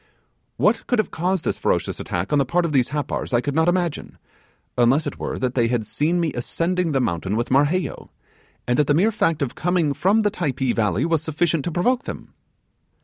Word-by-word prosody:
'What - - +1
could 245 - +1
have 215 - 0
caused 180 +1 -1
this - - -1
ferocious - - -1
attack 90 +7 -3
on 145 - +4
the - - +4
part 170 +7 +1
of 165 - -2
these 130 -4 +2
Happars 145 -3 -2
I - - +4
could 145 +2 -3
not 160 +2 +2
imagine, 175 -4 -2 0.6
unless 125 +5 +3
it - - -5
were - - -3
that 130 -1 -1
they 120 -3 +2
had 115 -2 -1
seen 160 - 0
me 165 -5 0
ascending 170 +7 -1
the 135 - +1
mountain 95 -3 -1
with 120 +3 -2
Marheyo, 145 +7 +1 0.6
and 125 +2 +1
that 150 - +3
the 145 - +3
mere 200 +8 +3
fact 165 -8 0
of 130 - -3
coming 175 -4 0
from 205 +8 +2
the 205 - +2
Typee 135 - -1
valley 105 - +1
was 165 -2 +1
sufficient 160 -1 0
to 175 - -2
provoke 245 - +1
them. - - -8
150 Hz, 210 wpm, -22 LUFS, 125-175 Hz, 0.6 s, on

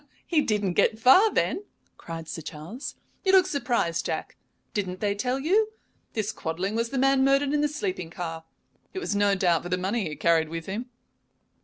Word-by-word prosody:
"He 320 -4 +2
didn't 205 -7 0
get 220 - +3
far, 315 - +6
then!" 395 - 0 0.3
cried 165 -1 -8
Sir 165 - -5
Charles. 160 - -7 0.3
"You 385 -1 +3
look 375 -2 +7
surprised, 240 - 0
Jack. - - -4 0.4
Didn't 185 -3 -2
they 205 -1 +1
tell 250 +5 -1
you? 420 +9 +2 0.4
This 215 -3 -1
Quadling 180 +5 -3
was 230 +1 0
the 270 - -3
man 270 0 +4
murdered 275 +1 +3
in 295 - +2
the 295 - +3
sleeping 190 - -3
car. 165 -1 -5 0.5
It - - -4
was 295 - -2
no 200 -1 +3
doubt 175 -4 +2
for 175 - -7
the 180 - +1
money 190 0 -1
he 150 - -6
carried 165 -1 +2
with 165 0 -5
him." 220 +6 -4
210 Hz, 190 wpm, -26 LUFS, 175-275 Hz, 0.5 s, look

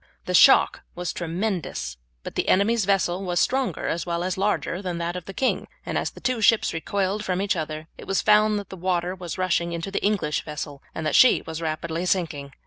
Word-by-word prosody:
The - - -3
shock - - +6
was 175 0 -3
tremendous, 175 - -3 0.3
but - - -7
the - - -1
enemy's 210 +2 +3
vessel 190 -2 +1
was 175 -2 0
stronger 265 0 0
as 170 - -1
well 170 0 -2
as 185 0 -1
larger 195 -2 -1
than 180 -3 -3
that 170 +1 -3
of 180 -2 -6
the - - -7
king; 260 - 0 0.2
and - - -4
as - - 0
the - - -14
two 255 -3 -1
ships 220 +1 +4
recoiled 195 +5 -1
from 185 -2 -1
each 195 0 +1
other 155 -1 -4
it - - -10
was 195 - +1
found 215 0 +4
that 205 - -6
the - - -7
water 180 0 -1
was 175 -5 -6
rushing 170 -2 0
into 170 +3 -4
the - - -2
English 195 -8 +1
vessel, 150 -2 -6
and 160 - -4
that 155 - 0
she 255 - +6
was 160 0 -6
rapidly 165 +2 -2
sinking. 155 -7 -1
180 Hz, 220 wpm, -24 LUFS, 165-200 Hz, 0.3 s, shock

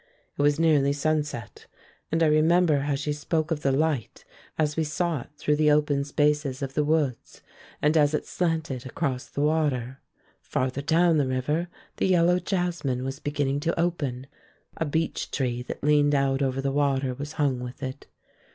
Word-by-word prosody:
It - - -2
was 145 +1 +3
nearly 145 -4 +3
sunset, 145 -6 -2 0.4
and 165 +1 +2
I - - +5
remember 155 0 +4
how 140 0 -1
she 145 +2 -2
spoke 155 +2 -2
of 155 -2 -1
the 135 - +2
light 145 -3 -1 0.3
as 150 -2 0
we 160 - +1
saw 155 -1 -1
it - - -13
through 150 0 +1
the 155 0 +4
open 150 -1 +2
spaces 145 -2 0
of 135 -1 -4
the 150 - +1
woods 145 -5 -1 0.4
and 150 +2 +3
as 150 -1 +4
it - - -2
slanted 160 -7 -2
across 130 -1 -3
the 140 - -4
water. 145 -5 0 0.4
Farther 130 +2 -2
down 165 +2 +3
the 140 - +1
river 150 +7 -1 0.3
the - - +1
yellow 180 -1 +4
jasmine 175 -9 -1
was 135 +2 -4
beginning 145 -2 -1
to 165 +3 -1
open. 145 -7 -1 0.5
A 165 - -2
beech 160 +2 -2
tree 125 -3 -2
that 125 - -7
leaned 145 0 +4
out 135 0 +1
over 135 -1 0
the 135 0 -1
water 135 -2 +1
was 145 +4 -7
hung 140 -5 0
with 125 +3 -7
it. 130 0 -6
145 Hz, 180 wpm, -26 LUFS, 135-160 Hz, 0.5 s, I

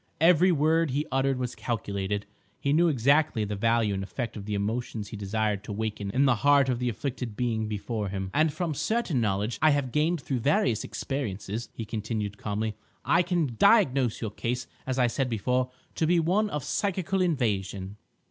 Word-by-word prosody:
Every 175 +3 +5
word 160 +1 +2
he 145 +4 -1
uttered 135 0 +1
was 125 -1 -3
calculated; 100 -3 -3 0.3
he 140 - +1
knew 170 +3 +4
exactly 140 -4 +3
the 105 0 -3
value 115 0 +2
and 95 - -2
effect 115 +4 -4
of 100 -2 -7
the 105 0 -2
emotions 110 +1 -3
he - - -7
desired 105 0 -1
to - - -6
waken 105 -1 -3
in 130 +7 +2
the 125 -4 +3
heart 140 +2 +4
of 125 -2 0
the 125 -1 0
afflicted 120 -2 -4
being 115 -3 0
before 105 0 -3
him. 95 -1 -4
"And 155 +1 +3
from 160 +1 -2
certain 185 - 0
knowledge 105 +1 -1
I 155 - +6
have 145 -4 +1
gained 160 +4 +1
through 135 -2 -2
various 120 -4 +2
experiences," 110 -4 -4
he 115 - -5
continued 105 -2 -3
calmly, 105 +1 -2 0.3
"I 170 - +4
can 170 -8 0
diagnose 135 - +4
your 110 -3 -3
case 125 +3 -3 0.2
as 130 0 -1
I 125 - +4
said 125 +2 0
before 125 +3 0 0.2
to 160 - 0
be 175 +1 +4
one 190 +6 +2
of 150 -7 -3
psychical 190 +3 -1
invasion." 105 - -1
125 Hz, 185 wpm, -27 LUFS, 105-150 Hz, 0.3 s, I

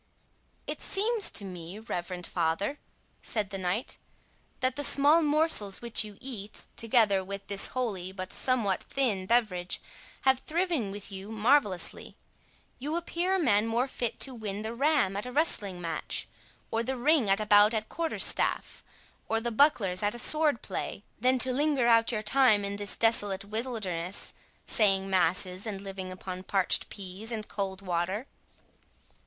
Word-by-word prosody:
"It - - -5
seems 430 +2 +2
to 205 - +1
me, 180 0 -8
reverend 180 -5 -4
father," 175 - -1 0.4
said 210 -3 -2
the 195 - -4
knight, 185 +6 -2 0.6
"that 255 0 +1
the 290 - -3
small 290 +4 +5
morsels 300 - +2
which 235 -1 -1
you 210 -2 -11
eat, 220 -6 -5
together 215 -4 +3
with 200 +1 -7
this 200 -1 +2
holy, 195 -8 -2
but 185 -1 -5
somewhat 230 -7 +1
thin 210 -9 -1
beverage, 195 -6 +1 0.4
have 265 -1 +3
thriven 330 - -1
with 200 +1 -7
you 195 +2 -7
marvellously. 220 -4 +1 0.6
You 295 +5 -3
appear 345 +2 -1
a - - +1
man 225 - +3
more 235 +3 0
fit 240 -3 -3
to 265 - -1
win 210 -3 -5
the 220 +1 -4
ram 270 -6 +2
at 205 +5 -3
a - - -6
wrestling 210 - 0
match, 165 -3 -4 0.4
or 225 - 0
the 260 +3 -3
ring 275 -3 +3
at 195 +1 +3
a 215 - -2
bout 210 +1 +5
at 215 0 -2
quarter 330 -1 -3
staff, - - +2 0.5
or 225 - +1
the 235 +1 -3
bucklers 220 -8 +3
at 205 +2 0
a - - -6
sword 300 0 +2
play, 195 +1 -5 0.2
than 255 +3 +3
to 255 0 +4
linger 285 -2 +1
out 230 0 +4
your 215 -2 -2
time 220 -3 +4
in 200 0 -3
this 205 0 -1
desolate 205 -4 +2
wilderness, 205 -6 -4 0.3
saying 195 -3 +2
masses, 185 +2 +1
and 200 -3 -4
living 195 -1 -6
upon 185 0 -7
parched 190 0 +1
pease 200 +3 -4
and 215 -2 -4
cold 195 -1 -4
water." 185 +5 -2
215 Hz, 160 wpm, -29 LUFS, 195-255 Hz, 0.6 s, small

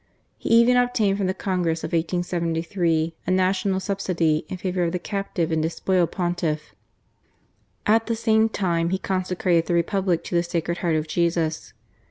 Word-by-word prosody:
He - - -4
even 235 +2 +6
obtained 220 -5 +2
from 195 - 0
the 185 - 0
Congress 175 -5 -1
of - - -3
1873 170 -1 -1
a - - 0
national 190 +1 +1
subsidy 175 -5 0
in 185 - -4
favour 180 0 -2
of 170 0 -1
the - - +1
captive 185 -3 -3
and 160 -1 +1
despoiled 170 +2 0
Pontiff. 175 -4 -2 1.1
At 225 +2 +3
the 230 - 0
same 220 0 +3
time, 170 -5 0
he 190 - 0
consecrated 180 -3 0
the 175 - +1
Republic 180 0 +1
to - - -7
the 170 - +3
Sacred 170 0 -2
Heart 170 -3 +1
of 155 0 -1
Jesus. 165 -1 -1
180 Hz, 165 wpm, -24 LUFS, 165-195 Hz, 1.1 s, even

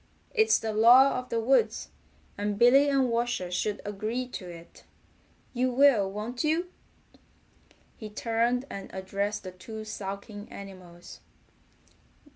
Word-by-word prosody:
It's 440 -1 +4
the 220 -1 -4
law 245 +5 +6
of 250 - -10
the 230 - -1
woods, 230 -2 +1 0.5
and 205 0 -2
Billy 270 +5 +6
and 270 -2 +2
Washer 230 -6 -1
should 205 +3 -2
agree 215 +5 -3
to 185 -7 -7
it. 170 -1 -13 0.7
You 255 +1 +1
will, 245 -7 +4
won't 225 +6 -4
you?" 330 +4 0 1.3
He 215 - -8
turned 230 +4 0
and 195 -6 -8
addressed 200 +2 -3
the 185 - -7
two 215 +4 -9
sulking 205 0 -7
animals. 185 -3 -11
220 Hz, 125 wpm, -28 LUFS, 200-250 Hz, 1.3 s, law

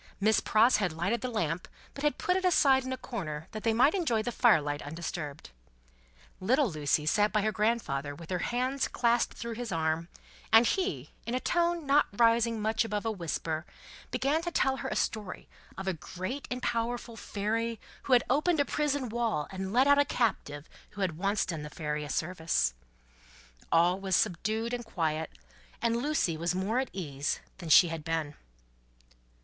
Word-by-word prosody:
Miss 215 +2 +4
Pross 225 +4 +4
had 190 -5 0
lighted 195 +8 -1
the 255 - -2
lamp, 180 -7 -2 0.3
but 280 - -8
had 295 - +1
put 360 - +1
it 375 - 0
aside 275 -7 +4
in 260 - -5
a 260 - -2
corner, 160 - -5
that 215 - -6
they 225 - +2
might 255 +8 +4
enjoy 285 - +1
the 240 - -2
fire 235 -8 +5
light 145 0 -3
undisturbed. 155 - -6 0.9
Little 245 +4 +2
Lucie 150 -1 0
sat 205 +7 +3
by 215 -1 +1
her 215 - +1
grandfather 210 -11 -1
with 165 +3 -11
her 180 - 0
hands 255 +6 0
clasped 235 0 +1
through 235 0 -4
his 235 -1 -5
arm: 160 0 0 0.4
and 225 +2 +7
he, 385 +8 -1 0.2
in 235 - -1
a - - +1
tone 340 +1 0
not 285 +2 +4
rising 230 +1 +3
much 220 +2 +1
above 210 -1 -3
a 225 - +1
whisper, 165 -4 -3 0.5
began 285 +4 +1
to 345 - -3
tell 270 -5 +1
her 265 -1 -4
a - - -3
story 210 -5 -3 0.3
of 190 - -5
a 190 - +1
great 185 - -6
and 250 0 -4
powerful 235 0 -2
Fairy 225 +2 -2 0.3
who 265 - +2
had 245 - +6
opened 300 +5 +2
a 285 - +3
prison 285 -3 -1
wall 225 -9 -1
and 190 0 -4
let 250 +5 +4
out 285 0 +5
a - - +6
captive 160 - -1 0.2
who 205 - -8
had 180 -5 0
once 200 +2 +1
done 165 -4 -4
the 150 - -7
Fairy 150 0 -3
a 145 - -7
service. 160 - 0 1.0
All 175 +3 +4
was 190 -2 0
subdued 220 +8 0
and 240 0 -3
quiet, 160 -7 -2 0.5
and 230 0 +1
Lucie 240 - 0
was 170 +2 -1
more 200 +6 0
at 265 - -2
ease 145 -6 -3 0.2
than 170 -3 -7
she 170 +3 +8
had 165 -2 -5
been. 160 -2 -2
215 Hz, 190 wpm, -30 LUFS, 165-245 Hz, 1.0 s, she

